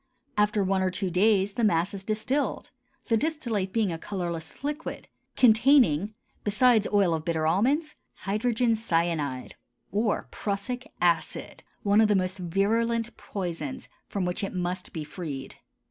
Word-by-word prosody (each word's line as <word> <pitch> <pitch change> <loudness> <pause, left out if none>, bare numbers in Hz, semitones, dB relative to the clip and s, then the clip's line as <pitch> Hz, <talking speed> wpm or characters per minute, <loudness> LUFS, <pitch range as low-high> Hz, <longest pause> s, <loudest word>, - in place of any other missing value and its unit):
After 210 0 +2
one 190 0 +1
or 185 - +2
two 185 0 -2
days 195 +1 +3
the 235 - -2
mass 175 -2 +2
is 195 -1 -5
distilled; 220 +7 -1 0.4
the 230 - +4
distillate 235 -10 -1
being 215 -3 +1
a 165 - -4
colorless 170 - -5
liquid, 295 +2 -4 0.3
containing, 220 - +5 0.3
besides 220 +1 +4
oil 200 -5 +3
of 160 -1 -2
bitter 160 -1 0
almonds, 270 - +2 0.3
hydrogen 230 +3 +1
cyanide 165 - -1 0.4
or 210 +2 0
prussic 230 +5 -4
acid, 170 -2 0 0.2
one 205 +1 +4
of 220 - +5
the 210 - +3
most 185 0 -1
virulent 225 +6 0
poisons, 170 -8 -5 0.2
from 195 -3 -2
which 180 +4 -2
it 195 - -3
must 180 0 -3
be 160 - -4
freed. 150 -4 -7
200 Hz, 145 wpm, -27 LUFS, 175-225 Hz, 0.4 s, containing